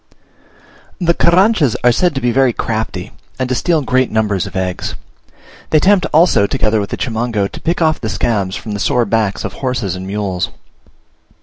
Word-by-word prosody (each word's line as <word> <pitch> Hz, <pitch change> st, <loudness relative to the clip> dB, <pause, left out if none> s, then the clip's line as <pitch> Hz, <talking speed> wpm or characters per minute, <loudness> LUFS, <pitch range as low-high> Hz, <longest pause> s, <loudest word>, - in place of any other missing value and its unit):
The 170 Hz, -2 st, +2 dB
Carranchas 170 Hz, -, +3 dB
are 125 Hz, -, +6 dB
said 175 Hz, +5 st, +1 dB
to 135 Hz, -, -2 dB
be 120 Hz, -, +1 dB
very 130 Hz, 0 st, +3 dB
crafty, 110 Hz, -5 st, -3 dB, 0.3 s
and 130 Hz, -, -1 dB
to -, -, +1 dB
steal 160 Hz, +3 st, +1 dB
great 130 Hz, 0 st, +1 dB
numbers 105 Hz, -4 st, 0 dB
of -, -, -11 dB
eggs. 95 Hz, -1 st, -3 dB, 0.7 s
They 155 Hz, -, +4 dB
attempt, 190 Hz, +4 st, +3 dB
also, 155 Hz, -, +4 dB
together 110 Hz, +1 st, +1 dB
with 100 Hz, -, -3 dB
the -, -, -4 dB
Chimango, 115 Hz, -4 st, -1 dB
to -, -, -9 dB
pick 170 Hz, +1 st, 0 dB
off 155 Hz, -1 st, +1 dB
the 110 Hz, -, -3 dB
scabs 100 Hz, -4 st, -1 dB
from 110 Hz, -, -6 dB
the 105 Hz, -, -3 dB
sore 125 Hz, +1 st, +1 dB
backs 110 Hz, -2 st, 0 dB
of -, -, -5 dB
horses 120 Hz, -8 st, -2 dB
and 95 Hz, +1 st, -7 dB
mules. 95 Hz, -3 st, -2 dB
120 Hz, 185 wpm, -16 LUFS, 105-150 Hz, 0.7 s, are